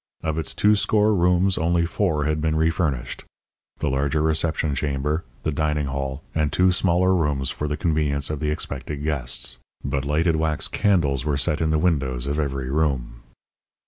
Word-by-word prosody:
Of 80 0 -1
its 80 - -4
two 105 +1 +4
score 105 +1 +2
rooms 90 +1 +3
only 85 0 +2
four 85 -4 0
had 75 0 0
been 80 0 +1
refurnished 80 -6 -1 0.5
the - - -2
larger 70 +3 0
reception 80 -1 0
chamber, 70 +3 -1 0.2
the 80 - 0
dining 75 0 0
hall, 70 +1 -4
and 75 -3 0
two 90 +4 +4
smaller 90 +1 +2
rooms 75 -6 0
for 75 - -3
the 75 0 -2
convenience 75 -3 0
of 75 - -3
the 75 - -1
expected 75 -1 -4
guests. 65 -5 -3 0.2
But 70 0 -1
lighted 80 +3 +1
wax 80 -1 0
candles 75 -10 +1
were 75 -1 0
set 75 +3 0
in 80 - +1
the 80 - +2
windows 70 -7 0
of 70 +2 -1
every 70 -3 -2
room. 65 -6 -1
75 Hz, 175 wpm, -23 LUFS, 70-80 Hz, 0.5 s, two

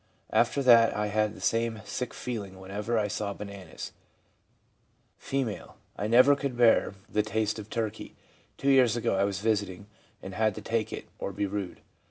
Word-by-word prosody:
After 140 - +3
that 115 -3 +6
I 105 0 0
had 105 0 +1
the - - -11
same 115 -1 0
sick 105 +5 -4
feeling 100 -6 -6
whenever 105 +5 -2
I 105 -1 +1
saw 105 0 -3
bananas/ 100 -2 -8 1.3
F. 135 -6 -2 0.2
' - - -38
I 105 - -2
never 125 +5 +6
could 140 -3 -3
bear 115 -4 +4
the 105 - +1
taste 110 0 -1
of 105 0 -9
turkey. 110 -2 -4 0.4
Two 140 - +2
years 125 -4 +5
ago, 120 - 0
I 100 - +3
was 100 -1 -2
visiting, 100 -3 -1 0.4
and 95 - -7
had 110 0 +1
to 110 - -6
take 115 +1 -1
it, - - -6
or - - -3
be 100 +1 -1
rude. 100 -2 -4
110 Hz, 180 wpm, -28 LUFS, 100-115 Hz, 1.3 s, that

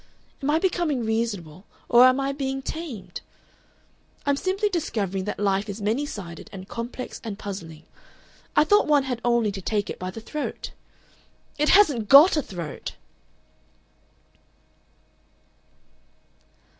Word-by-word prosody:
"Am 275 - -1
I 305 - +4
becoming 325 - 0
reasonable 205 -7 -2 0.2
or 240 +1 +7
am 255 +1 +3
I 275 0 0
being 270 -1 -3
tamed? 290 - -6 1.0
"I'm 285 -1 +3
simply 380 +7 0
discovering 210 - -2
that 210 - -3
life 200 0 0
is 200 +2 -5
many 225 +8 0
sided 170 - -8
and 190 -2 -9
complex 235 +3 -6
and 215 -4 -5
puzzling. 165 -7 -7 0.7
I 300 - +6
thought 410 +7 +4
one 295 -2 +4
had 250 -3 -3
only 235 -3 +2
to 195 -1 -6
take 205 +1 -1
it - - -8
by 185 - -4
the 190 - -7
throat. 295 +6 -5 0.9
"It 300 - +3
hasn't 285 - +5
GOT 295 +7 +9
a - - +3
throat!" 175 - -7
235 Hz, 130 wpm, -25 LUFS, 200-290 Hz, 1.0 s, GOT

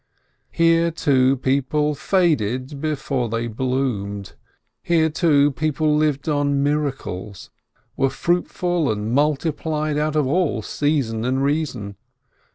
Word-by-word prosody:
Here, 165 0 +3
too, 135 -4 +2
people 140 +3 0
faded 140 - 0
before 140 -5 -2
they 115 +1 -2
bloomed. 110 -6 -2 0.5
Here, 160 -2 +2
too, 145 -3 +3
men 155 0 +1
lived 150 -2 0
on 145 -2 +1
miracles, 135 -10 -3 0.4
were 135 0 +2
fruitful 175 - 0
and 105 +2 -3
multi 150 +3 +2
plied 155 -1 -2
out 155 0 -1
of 150 -2 +2
all 145 -6 0
season 135 -7 -1
and 130 +2 0
reason. 135 - -2
140 Hz, 115 wpm, -21 LUFS, 130-155 Hz, 0.5 s, Here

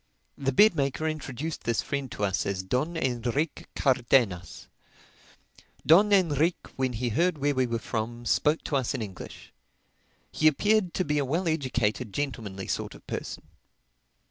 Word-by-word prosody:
The 135 -1 -1
bed 210 +8 +6
maker 140 +2 -1
introduced 155 0 -4
this 115 -4 0
friend 140 -3 -3
to 105 - -4
us 95 -1 0
as 95 -2 -2
Don 140 - -1
Enrique 125 +4 -1
Cardenas. 120 - +1 1.2
Don 200 +6 +6
Enrique 170 -3 +2
when 130 -1 -1
he 120 +2 -1
heard 170 +8 +1
where 145 0 +1
we 130 -2 +1
were 115 -1 -1
from, 120 +1 -4
spoke 150 +6 +2
to 145 - 0
us 130 -3 -1
in 115 - -2
English. 95 -3 -10 0.8
He 155 - +3
appeared 200 +4 +2
to 185 - 0
be 150 0 +1
a - - +1
well 165 +7 -1
educated, 125 -8 -1
gentlemanly 110 -9 -4
sort - - -3
of - - -16
person. - - -5
135 Hz, 155 wpm, -27 LUFS, 115-155 Hz, 1.2 s, bed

